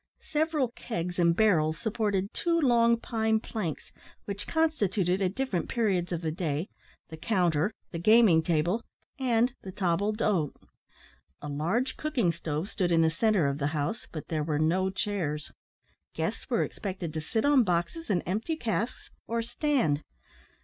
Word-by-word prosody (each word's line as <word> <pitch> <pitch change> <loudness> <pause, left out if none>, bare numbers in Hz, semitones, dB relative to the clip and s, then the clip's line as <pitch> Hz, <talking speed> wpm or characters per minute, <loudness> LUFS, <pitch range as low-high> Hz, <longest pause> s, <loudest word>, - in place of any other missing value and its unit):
Several 305 -4 +1
kegs 180 -7 -4
and 170 -1 +4
barrels 165 -7 +3
supported 205 -1 -1
two 335 -1 +1
long 235 -5 +4
pine 220 -1 +1
planks 205 -8 -5 0.3
which 200 0 -5
constituted 205 - +1
at 190 0 0
different 260 -11 -1
periods 190 -7 0
of 170 -1 -2
the 160 - 0
day 160 0 -2 0.4
the 160 - -8
counter, 175 -1 +1 0.2
the 165 - -4
gaming 215 -3 +6
table, 170 +7 0 0.4
and 245 -1 +2
the 190 - -7
table 190 +1 +1
d'hote. 205 -8 0 0.9
A - - -4
large 185 - -1
cooking 255 - +1
stove 160 +1 -3
stood 180 -4 -1
in 165 -1 +4
the 160 - +3
centre 210 -2 +2
of 140 +1 -1
the 140 - +1
house, 150 +12 -2
but 155 - -7
there 155 -2 0
were 150 -1 -1
no 175 +5 +2
chairs; 180 -6 -2 0.6
guests - - -3
were - - +2
expected 185 -5 -5
to 160 - -3
sit 220 - -1
on 285 -3 +5
boxes 180 - -1
and 180 -4 +1
empty 220 - -1
casks, 230 -4 -3 0.2
or 230 0 -1
stand. 240 - +1
195 Hz, 155 wpm, -29 LUFS, 165-230 Hz, 0.9 s, gaming